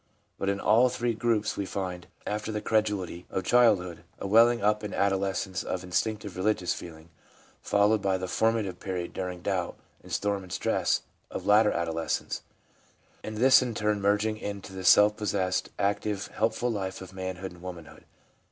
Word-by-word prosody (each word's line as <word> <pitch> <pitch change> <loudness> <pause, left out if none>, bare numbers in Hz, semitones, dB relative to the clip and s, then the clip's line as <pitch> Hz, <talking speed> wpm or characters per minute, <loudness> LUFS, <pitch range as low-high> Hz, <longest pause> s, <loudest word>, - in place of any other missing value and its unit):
But 100 - 0
in 100 0 0
all 115 +5 +4
three 120 -1 -1
groups 110 -2 0
we 100 - -3
find, 90 -3 -4 0.2
after 105 +1 -3
the 105 - -2
credulity 105 -5 -1
of 95 - -2
childhood, 95 -7 +3
a - - -6
welling 115 +4 +5
up 105 +1 +2
in 105 - -4
adolescence 95 -1 0
of 90 0 -3
instinctive 100 +2 -2
religious 95 -1 0
feeling, 80 -1 -10 0.5
followed 105 +1 +3
by 95 -1 +1
the 95 0 -4
formative 110 -2 0
period 90 -3 -4
during 90 -1 -5
doubt 95 -3 -2 0.2
and - - -14
storm 100 -1 0
and 90 -1 -12
stress - - 0 0.3
of - - -6
later 105 +1 +5
adolescence, 85 -1 -2 0.8
and 110 0 -6
this 130 +4 +7
in 120 -3 -3
turn 105 -1 0
merging 105 +2 +1
into 100 -2 -6
the 95 0 -6
self 105 +3 +6
possessed, 95 -3 -1
active, 100 0 -1
helpful 115 +2 0
life 95 -3 -3
of 95 0 -10
manhood 95 0 -5
and 90 -1 -15
woman 90 -3 -7
hood. - - -16
100 Hz, 170 wpm, -28 LUFS, 95-110 Hz, 0.8 s, this